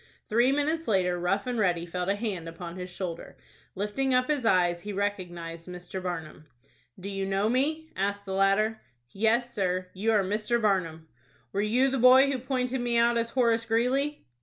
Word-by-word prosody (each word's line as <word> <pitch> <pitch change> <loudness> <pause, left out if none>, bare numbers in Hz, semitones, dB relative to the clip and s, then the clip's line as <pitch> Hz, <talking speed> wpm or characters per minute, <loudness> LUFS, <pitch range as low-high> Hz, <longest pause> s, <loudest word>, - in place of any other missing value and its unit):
Three 240 +4 +4
minutes 310 +3 0
later, 180 -4 +1
Rough 185 +3 0
and 250 -2 -2
Ready 175 -4 +1
felt 180 +2 -3
a 200 - +2
hand 200 -6 -4
upon 170 +1 -8
his 180 0 -6
shoulder. 175 -2 -6 0.4
Lifting 250 +7 0
up 255 +2 +2
his 275 -6 0
eyes, 175 -3 +3
he 205 +3 -6
recognized 175 -4 -4
Mr. 180 +1 -7
Barnum. 165 -4 -6 0.5
"Do 185 - -7
you 195 -1 -3
know 195 +2 +1
me?" 305 +7 0
asked 200 +1 -2
the 190 - -4
latter. 195 +3 +2 0.3
"Yes, 230 +4 +1
sir, 185 -3 -1
you 210 +4 0
are 210 -3 +3
Mr. 215 +5 0
Barnum." 175 -7 0 0.5
"Were 200 - 0
you 245 +6 +2
the 265 0 -1
boy 260 +3 +7
who 265 - -2
pointed 255 0 -2
me 240 -1 0
out 235 0 +4
as 230 0 0
Horace 235 -2 +1
Greeley?" 260 +6 0
205 Hz, 185 wpm, -28 LUFS, 180-245 Hz, 0.5 s, boy